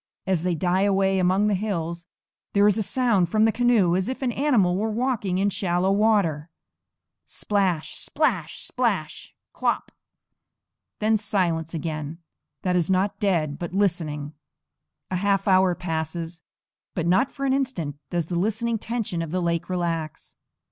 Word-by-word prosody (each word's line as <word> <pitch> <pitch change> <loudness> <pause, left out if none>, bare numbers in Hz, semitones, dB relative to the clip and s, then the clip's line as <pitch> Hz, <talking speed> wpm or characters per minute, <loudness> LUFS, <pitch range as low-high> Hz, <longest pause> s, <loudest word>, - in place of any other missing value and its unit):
As 185 -4 +1
they 180 0 0
die 180 +3 +1
away 195 -1 +2
among 185 +3 +3
the 210 - +2
hills 175 -4 -3 0.5
there 200 0 +4
is 210 +1 +3
a - - +2
sound 210 -4 +2
from 215 +3 +3
the 225 - +4
canoe 225 -7 +3
as 190 +5 0
if 260 +1 -4
an 250 - +1
animal 235 -10 +2
were 215 +4 0
walking 220 -5 -1
in 200 +1 +1
shallow 180 0 0
water, 195 -7 +2 0.8
splash, 190 -6 -1
splash, 210 - -1
splash, 210 -11 -2 0.2
klop! - - -1 1.1
then 215 +1 +2
silence 175 -6 -1
again, 155 -1 -4 0.5
that 180 -1 +1
is 175 -1 +2
not 190 +2 +1
dead, 165 -8 0
but 175 0 -5
listening. 155 -7 -1 0.8
A 185 - 0
half 195 +1 +1
hour 185 -2 +4
passes; 165 0 -4 0.5
but 170 - -1
not 185 +10 +3
for 275 - -5
an 265 - +2
instant 250 - -2
does 170 -2 -1
the 170 +1 -2
listening 225 +3 0
tension 220 -7 -3
of 165 - -4
the 185 +3 -1
lake 170 -1 -1
relax. 165 -4 -3
185 Hz, 155 wpm, -24 LUFS, 170-210 Hz, 1.1 s, there